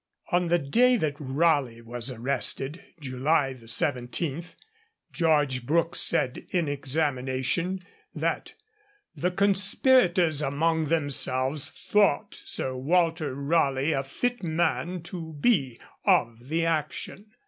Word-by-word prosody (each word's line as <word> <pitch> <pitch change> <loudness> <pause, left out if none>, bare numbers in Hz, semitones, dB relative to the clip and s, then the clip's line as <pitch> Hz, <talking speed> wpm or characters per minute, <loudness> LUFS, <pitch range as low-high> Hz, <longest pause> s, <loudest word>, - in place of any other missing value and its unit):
On 175 -1 +2
the 175 +1 +3
day 240 - +3
that 155 -8 -1
Raleigh 135 -4 +1
was 120 +2 -5
arrested, 135 - -2 0.2
July 135 +1 0
17, 130 +5 -2 0.7
George 150 -7 +1
Brooke 165 +5 +1
said 125 - +1
in 175 -4 0
examination 145 +5 -1 0.3
that - - -2 0.6
'the 180 - -1
conspirators 190 - +3
among 160 +3 +1
themselves 145 -2 +1 0.2
thought 205 -8 +3
Sir 130 0 -3
Walter 160 0 +1
Raleigh 140 0 +1
a 135 -3 +1
fit 245 - -3
man 170 +1 -1
to 165 -2 -7
be 140 - +1 0.2
of 115 +2 +1
the 165 +1 +1
action.' 165 +5 -3
155 Hz, 105 wpm, -26 LUFS, 135-175 Hz, 0.7 s, the